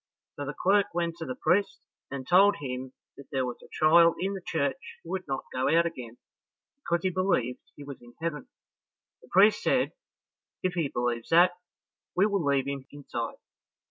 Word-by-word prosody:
So 145 Hz, -, -5 dB
the 145 Hz, -, -5 dB
clerk 195 Hz, -1 st, +2 dB
went 170 Hz, -1 st, -1 dB
to 165 Hz, -, -5 dB
the 130 Hz, -, -4 dB
priest, 185 Hz, +5 st, +1 dB, 0.3 s
and 135 Hz, -2 st, -6 dB
told 200 Hz, +3 st, +6 dB
him 130 Hz, -4 st, -6 dB, 0.2 s
that 140 Hz, -, -13 dB
there 130 Hz, -2 st, 0 dB
was 125 Hz, -1 st, -5 dB
a -, -, -15 dB
child 165 Hz, +2 st, +5 dB
in 195 Hz, +2 st, -1 dB
the 195 Hz, -, -6 dB
church 140 Hz, -6 st, -3 dB
who 170 Hz, -, -9 dB
would 185 Hz, -2 st, -3 dB
not 135 Hz, -1 st, -3 dB
go 130 Hz, 0 st, 0 dB
out 170 Hz, +1 st, +4 dB
again, 125 Hz, -8 st, -6 dB, 0.6 s
because 170 Hz, -11 st, -2 dB
he 185 Hz, -, +1 dB
believed 170 Hz, -10 st, 0 dB, 0.2 s
he 145 Hz, -, -10 dB
was 140 Hz, -1 st, -9 dB
in 120 Hz, 0 st, -16 dB
heaven. 160 Hz, -3 st, -4 dB, 0.7 s
The -, -, -19 dB
priest 205 Hz, +3 st, +5 dB
said, -, -, +1 dB, 0.7 s
"If 185 Hz, -1 st, 0 dB
he 165 Hz, -4 st, 0 dB
believes 120 Hz, -2 st, -2 dB
that, 175 Hz, +2 st, +6 dB, 0.6 s
we 190 Hz, -, +4 dB
will 200 Hz, -4 st, 0 dB
leave 140 Hz, -2 st, +2 dB
him 140 Hz, -1 st, -5 dB
inside." 125 Hz, -5 st, -5 dB
160 Hz, 185 wpm, -28 LUFS, 130-180 Hz, 0.7 s, told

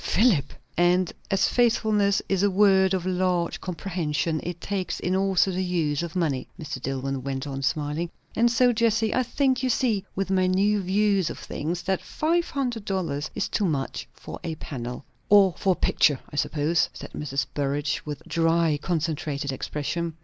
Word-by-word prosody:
"Philip! 190 Hz, -, +3 dB, 0.2 s
" -, -, -34 dB, 0.2 s
"And 185 Hz, -1 st, -1 dB, 0.2 s
as 195 Hz, 0 st, +3 dB
faithfulness 215 Hz, -4 st, +2 dB
is 195 Hz, -1 st, +1 dB
a 205 Hz, -, +4 dB
word 190 Hz, -1 st, +4 dB
of 185 Hz, -1 st, -3 dB
large 180 Hz, -2 st, 0 dB
comprehension, 165 Hz, -3 st, -2 dB
it 175 Hz, -1 st, -5 dB
takes 195 Hz, 0 st, -3 dB
in 180 Hz, +1 st, 0 dB
also 190 Hz, 0 st, +2 dB
the 185 Hz, +1 st, -1 dB
use 165 Hz, -5 st, 0 dB
of 170 Hz, 0 st, -5 dB
money," 150 Hz, -8 st, 0 dB
Mr. 150 Hz, -2 st, -5 dB
Dillwyn 135 Hz, 0 st, -3 dB
went 135 Hz, 0 st, -3 dB
on 135 Hz, -1 st, -4 dB
smiling; 150 Hz, +4 st, -1 dB, 0.3 s
"and 235 Hz, +1 st, +4 dB
so, 245 Hz, +1 st, +4 dB
Jessie, 220 Hz, -1 st, +2 dB
I 255 Hz, -, +2 dB
think, 260 Hz, +1 st, +1 dB
you 260 Hz, -, 0 dB
see, 225 Hz, -5 st, +1 dB
with 195 Hz, 0 st, -2 dB
my 185 Hz, -1 st, +3 dB
new 200 Hz, +3 st, +2 dB
views 195 Hz, -1 st, +2 dB
of -, -, -6 dB
things, 170 Hz, +4 st, -4 dB
that 190 Hz, -1 st, 0 dB
five 340 Hz, +2 st, 0 dB
hundred 245 Hz, -6 st, -2 dB
dollars 170 Hz, -7 st, -2 dB
is 205 Hz, -, -1 dB
too 205 Hz, -, 0 dB
much 140 Hz, -6 st, -2 dB
for -, -, -9 dB
a 165 Hz, -2 st, -3 dB
panel." 125 Hz, -3 st, -6 dB, 0.2 s
"Or 200 Hz, -3 st, +6 dB
for 190 Hz, -, +2 dB
a -, -, -1 dB
picture, 145 Hz, -3 st, +3 dB
I -, -, -5 dB
suppose!" 150 Hz, +3 st, +1 dB
said -, -, -8 dB
Mrs. 140 Hz, -2 st, -2 dB
Burrage, 145 Hz, -1 st, -1 dB
with 150 Hz, -2 st, -6 dB
dry 165 Hz, -2 st, +2 dB
concentrated 155 Hz, -4 st, -2 dB
expression. 155 Hz, +5 st, -3 dB
180 Hz, 180 wpm, -25 LUFS, 150-200 Hz, 0.3 s, Or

